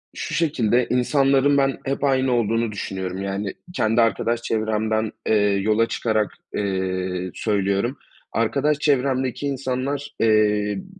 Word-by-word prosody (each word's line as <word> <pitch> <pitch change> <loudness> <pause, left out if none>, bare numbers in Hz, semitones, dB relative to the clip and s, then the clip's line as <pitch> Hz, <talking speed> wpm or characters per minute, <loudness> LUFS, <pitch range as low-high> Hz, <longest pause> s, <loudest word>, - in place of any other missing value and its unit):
Şu - - -5
şekilde 125 -7 +1
insanların, 135 +2 +3
ben, 135 -1 +2
hep 135 +1 -2
aynı 130 -2 +2
olduğunu 115 -1 +1
düşünüyorum, 95 -2 -4
yani, 100 0 -3 0.2
kendi 110 -5 +2
arkadaş 115 +1 +1
çevremden, 110 -1 -1 0.2
eee, 110 - +3 0.3
yola 110 +2 +2
çıkarak, 110 -2 0 0.2
eee, 95 -2 -2
söylüyorum. 100 +4 0 0.3
Arkadaş 140 +6 +1
çevremdeki 135 -2 0
insanlar, 135 +1 -2
eee, 105 -2 +2
b - - -10
115 Hz, 120 wpm, -22 LUFS, 105-135 Hz, 0.3 s, insanların